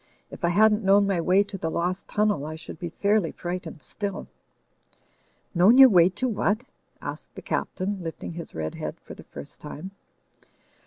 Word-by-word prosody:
If - - -11
I 170 - +3
hadn't 210 +4 +4
known 200 +1 +5
my 195 -4 +1
way 185 +4 +4
to 200 -1 -8
the 160 - -2
lost 180 +3 -2
tunnel, 210 -8 +1
I 155 +1 -5
should 160 0 -9
be 175 - -4
fairly 200 0 +1
frightened 175 -4 -6
still." 200 - -5 1.3
"Known 190 +7 +6
your 270 -1 +10
way 180 -4 +6
to 255 +7 -1
what?" 215 0 0 0.4
asked - - -7
the - - -8
Captain, 195 +1 -2
lifting 165 0 -6
his 170 -1 -8
red 80 -1 -3
head - - -6
for - - -11
the - - -13
first - - -10
time. 185 +6 -8
185 Hz, 175 wpm, -26 LUFS, 170-205 Hz, 1.3 s, your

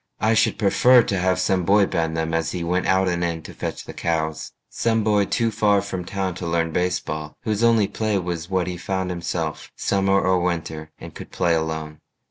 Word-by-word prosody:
I 110 +1 +2
should 110 - +2
prefer 120 +4 +5
to 95 -3 -1
have 95 0 +1
some 95 0 +1
boy 100 +3 +4
bend 80 -3 -1
them 80 0 -2
As 80 -1 -1
he 90 -2 -3
went 90 +2 0
out 95 0 +3
and 85 -1 0
in 85 -2 -2
to - - -10
fetch - - -5
the - - -9
cows 80 -2 -2 0.2
Some 115 -1 0
boy 105 -1 +3
too 115 +1 0
far 105 -1 +3
from 95 -3 -5
town 95 -1 -2
to 85 - -3
learn 85 0 0
baseball, 85 -4 -2
Whose 110 0 -1
only 115 -3 +4
play 110 -1 -1
was 85 -2 -4
what 95 -2 0
he 90 -1 -4
found 95 +1 -2
himself, 85 -3 -4
Summer 95 0 +2
or 95 -1 +2
winter, 80 -3 -3
and - - -10
could - - -10
play 85 - +1
alone. 80 -1 -3
90 Hz, 210 wpm, -23 LUFS, 80-100 Hz, 0.2 s, prefer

